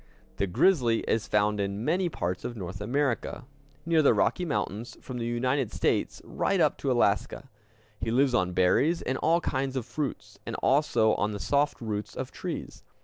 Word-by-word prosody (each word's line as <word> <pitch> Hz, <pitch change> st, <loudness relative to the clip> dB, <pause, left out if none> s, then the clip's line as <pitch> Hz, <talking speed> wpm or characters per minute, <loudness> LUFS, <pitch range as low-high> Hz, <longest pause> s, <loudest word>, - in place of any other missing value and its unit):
The 100 Hz, -, 0 dB
grizzly 120 Hz, -, +3 dB
is 110 Hz, -1 st, -1 dB
found 105 Hz, 0 st, +1 dB
in 100 Hz, +3 st, -2 dB
many 175 Hz, +3 st, +1 dB
parts 90 Hz, -, -3 dB
of 120 Hz, -, -5 dB
North 95 Hz, 0 st, -6 dB
America, 130 Hz, +2 st, -1 dB, 0.4 s
near 165 Hz, -1 st, +3 dB
the 145 Hz, -, +4 dB
Rocky 180 Hz, -, +1 dB
Mountains, 120 Hz, -, -3 dB
from 125 Hz, -2 st, -7 dB
the 115 Hz, -, -2 dB
United 125 Hz, +1 st, 0 dB
States -, -, -1 dB
right -, -, 0 dB
up -, -, +3 dB
to -, -, 0 dB
Alaska. -, -, 0 dB, 0.5 s
He 115 Hz, -, -2 dB
lives 130 Hz, +3 st, +3 dB
on 90 Hz, -4 st, +1 dB
berries 135 Hz, -, +2 dB
and 130 Hz, 0 st, -2 dB
all 170 Hz, +1 st, +2 dB
kinds 135 Hz, -2 st, -2 dB
of 130 Hz, -4 st, -2 dB
fruits, 145 Hz, -5 st, -5 dB
and -, -, -5 dB
also 130 Hz, -6 st, +3 dB
on 105 Hz, +1 st, 0 dB
the 100 Hz, -, -5 dB
soft 145 Hz, +6 st, +1 dB
roots 105 Hz, -3 st, -4 dB
of -, -, -5 dB
trees. -, -, -6 dB
120 Hz, 180 wpm, -28 LUFS, 105-140 Hz, 0.5 s, the